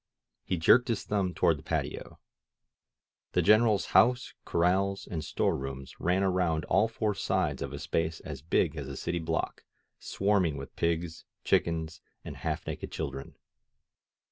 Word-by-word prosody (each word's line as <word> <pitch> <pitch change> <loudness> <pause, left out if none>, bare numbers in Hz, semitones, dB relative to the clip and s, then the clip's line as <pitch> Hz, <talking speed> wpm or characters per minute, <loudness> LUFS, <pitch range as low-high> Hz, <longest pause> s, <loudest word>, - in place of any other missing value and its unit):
He 90 - -1
jerked 115 +9 +5
his 115 -4 -1
thumb 95 -4 -1
toward 85 -4 +3
the - - -14
patio. - - -3 1.2
The - - +3
Greneral's 110 -1 +4
house, 125 +1 +4
corrals 95 +3 +1
and 80 -3 -4
store - - 0
rooms 70 0 -7
ran 90 +2 +1
around 90 -5 +1
all 110 - +3
four 110 -2 -1
sides - - -1
of 70 - -3
a 70 - -5
space 80 +2 -1
as 70 -4 -7
big 80 0 +1
as 70 -4 -5
a 70 -1 -6
city 85 - -2
block, 80 - -3 0.4
swarming 95 -7 +1
with 70 - -9
pigs, 85 0 -2 0.2
chickens 80 0 0 0.2
and - - -7
half - - -3
naked - - -5
children. 70 0 -5
85 Hz, 150 wpm, -29 LUFS, 80-100 Hz, 1.2 s, jerked